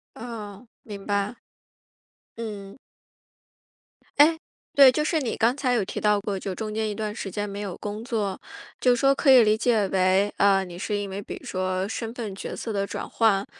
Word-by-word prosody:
哦， 220 -1 -8
明 200 -3 -9
白。 200 +2 0 1.0
嗯。 210 -2 -7 1.4
诶， 320 +3 +6 0.4
对， 275 -2 +9
就 300 - 0
是 320 +1 +1
你 245 - -2
刚 240 +4 +2
才 260 -3 0
有 230 -5 +2
提 - - -5
到 210 -1 +3
过， 200 -1 -3
就 190 0 -4
中 215 +1 -5
间 220 0 -1
一 205 - -3
段 215 -1 -4
时 200 -3 -5
间 205 +2 -3
没 200 +1 -6
有 195 -4 -5
工 210 +2 -5
作， 210 -6 -2 0.4
就 250 -1 +4
说 275 +3 +3
可 275 0 +3
以 250 -2 +8
理 215 0 +3
解 220 -3 +2
为， 190 +2 +2
啊， 195 -1 +4
你 175 -1 -9
是 210 +2 -2
因 205 -1 -3
为， 195 +1 -5
比 - - -7
如 - - -14
说 185 0 -1
身 225 0 -4
份 220 -5 -5
角 - - -6
色 225 - -5
的 200 -1 -1
转 - - -6
换， 205 -3 +2
210 Hz, 210 characters per minute, -25 LUFS, 195-230 Hz, 1.4 s, 对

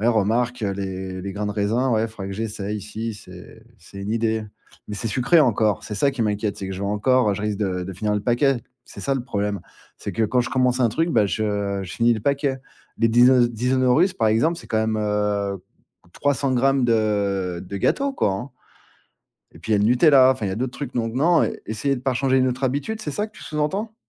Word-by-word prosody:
ouais, 115 - +2
remarque, 115 +2 +1
heu, 100 - 0
les 95 -1 -5
les 100 0 -5
grains 105 +1 -3
de 105 - -2
raisin, 110 +5 0
ouais, 110 +1 +1
faudra 105 -3 -8
que 100 - -5
j'essaie 105 -1 -4
si, 110 +2 -5
c'est 95 +3 -13 0.2
c'est 95 +3 -13
une 100 +2 -4
idée. 110 -1 0 0.4
Mais 105 - -5
c'est 115 - -3
sucré 125 +9 +3
encore, 110 -8 +2
c'est 110 -1 -5
ça 140 +7 +2
qui 130 -4 -2
m'inquiète, 105 -1 -1
c'est 95 - -5
que 95 - -5
j'aurais 100 +2 -2
encore, 125 +1 +2
heu, - - 0
je 105 - -5
risque 105 -1 -2
de 90 -3 -2
de 95 - -6
finir 105 +3 -1
le 105 - 0
paquet. 125 0 +2 0.2
C'est - - -11
ça 135 - 0
le 130 - -2
problème, 105 -4 -2 0.4
c'est 100 - -5
que 110 +4 +1
quand 125 +4 +2
je 120 - -3
commence 125 -1 +1
un 120 - +4
truc, 165 +10 0
bah, 105 - +3
je, 110 - -2
heu, 100 -1 -1
je 90 - -8
finis 120 0 +3
le 110 - -4
paquet. 140 +1 0 0.4
Les 115 - +3
Dinos 120 +1 +5
Dinosaurus 130 - +2
par 110 - +1
exemple, 155 +11 +2
c'est - - -12
quand 110 - -2
même, 110 0 0
heu, 105 -2 -1 0.5
300 140 -1 0
grammes 135 +1 +2
de 100 -5 0
de 100 - -5
gâteaux 275 - +1
quoi, 105 - +1
hein 120 +8 -5 1.0
et 80 - -14
puis 110 - -5
il 105 - +5
y - - +3
a - - +1
le 105 - +2
Nutella, 130 +1 +6
enfin, 115 -5 -3
il - - -1
y - - -3
a - - -3
d'autres 125 +2 -3
trucs, 145 - -6
donc 115 -1 -1
non, 165 +6 +3 0.2
essayer 115 +6 -1
de 125 - -7
par 130 -2 0
changer 130 0 +2
une 130 0 +3
autre 130 +2 -3
habitude, 145 - -2
c'est 150 - -4
ça 210 +9 -2
que 215 -2 -20
tu - - -11
sous-entends? 190 +9 -2
115 Hz, 245 wpm, -23 LUFS, 105-130 Hz, 1.0 s, Nutella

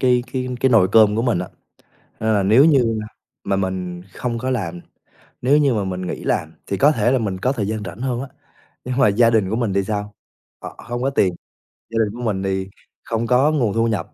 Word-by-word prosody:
cái 125 -2 +3
cái 130 -1 -2
cái 130 - +3
nồi 105 -6 +5
cơm 110 -2 +5
của 115 - +1
mình 120 -7 +1
á. 90 - -4 0.7
Nên 110 0 +1
là 100 - +2
nếu 110 +9 +5
như 125 -8 +3 0.5
mà 100 - 0
mình 90 -2 -3
không 120 -2 -3
có 130 +2 -2
làm, 90 -9 -3 0.6
nếu 135 +4 +4
như 140 -4 +3
mà 105 -3 0
mình 95 -1 -4
nghỉ - - -5
làm 80 0 -1
thì 100 - -2
có 145 +2 +5
thể 120 -3 +1
là 130 - +2
mình 100 -5 -2
có 125 +7 0
thời 105 -7 -2
gian 110 -1 -3
rảnh 110 +5 -8
hơn 125 -2 -2
á, 135 - -6 0.6
nhưng 125 0 -3
mà 135 - +5
gia 115 +3 +4
đình 110 -5 +2
của 110 - -1
mình 115 -5 -1
thì 100 0 +1
sao? 105 0 -4 0.5
Họ - - -8
hông 120 0 -3
có 135 - +2
tiền, 95 -9 +1 0.6
gia 115 - -4
đình 105 - -6
của 125 - -7
mình 100 -4 -1
thì 95 0 -2 0.3
không 115 0 -2
có 130 +5 +4
nguồn 120 -9 +1
thu 115 0 +1
nhập, 110 -3 -3
110 Hz, 240 wpm, -20 LUFS, 100-125 Hz, 0.7 s, nồi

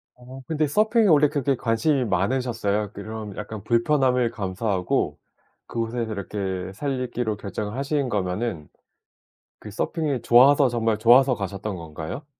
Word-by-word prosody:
어 130 +2 -12
근데 155 -1 0
서핑에 215 - +3
원래 150 -3 +5
그렇게 140 -2 0
관심이 120 +4 +1
많으셨어요? 105 -1 -1
그런 110 -2 -7
약간 105 -1 -7
불편함을 125 0 +2
감수하고 95 -2 -1 0.5
그곳에서 115 +1 -3
그렇게 95 -3 -4
살기로 125 -3 -2
결정을 105 +1 -5
하신 140 -1 -1
거면은 95 -3 -2 0.9
그 105 - -10
서핑이 140 - -2
좋아서 135 +4 +6
정말 115 -2 0
좋아서 125 +3 +5
가셨던 100 0 -4
건가요? 80 - -7
115 Hz, 325 characters per minute, -24 LUFS, 105-135 Hz, 0.9 s, 좋아서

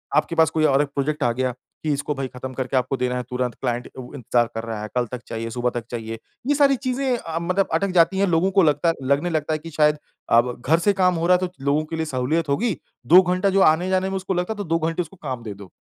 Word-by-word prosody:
आपके 155 +2 +1
पास 160 -2 +4
कोई 155 -1 +1
और 140 -1 +4
1 145 - 0
प्रोजेक्ट 150 +2 -1
आ 120 - +3
गया 130 +1 -1 0.3
कि 155 - 0
इसको 145 +1 -2
भाई 135 -1 -3
खत्म 130 +1 -8
करके 130 +1 -2
आपको 130 +1 0
देना 125 0 -1
है 125 - -3
तुरंत, 125 -1 -2
क्लाइंट 120 -1 -2
अ, 130 - -10
इंतज़ार 120 -2 +1
कर 115 - -3
रहा 110 -2 -5
है, 105 - -4
कल 125 -1 +2
तक 125 -1 -5
चाहिए, 115 0 -4
सुबह 125 +1 0
तक 115 - -14
चाहिए। 115 -1 -5 0.3
ये 290 - +3
सारी 280 -1 +4
चीज़ें 255 0 0
अ, 165 -7 -4
मतलब 185 +3 0
अटक 190 +4 +1
जाती 180 +3 +4
हैं, 200 - +3
लोगों 175 +2 +2
को 195 0 +4
लगता 155 +2 +2
लगने 140 +6 +1
लगता 155 -1 -1
है 155 - -1
कि 165 - -9
शायद 150 0 +4 0.3
अ, 115 - +7
घर 125 +6 0
से 200 +4 +2
काम 185 -2 +2
हो 165 0 0
रहा 180 0 +6
है 185 - 0
तो - - -17
लोगों 145 +2 +2
के 165 - -5
लिए 160 0 -2
सहूलियत 150 +3 -1
होगी। 200 +6 0 0.3
2 180 +7 +9
घंटा 185 +2 +1
जो 195 0 +3
आने-जाने 185 +3 0
में 195 - -2
उसको 190 0 -3
लगता 180 +4 -1
है - - -15
तो 205 - -3
2 165 -2 0
घंटे 165 +2 -1
उसको 175 +3 -9
काम 130 -4 -4
दे 105 -3 -6
दो। 100 -2 -13
155 Hz, 275 wpm, -22 LUFS, 125-180 Hz, 0.3 s, 2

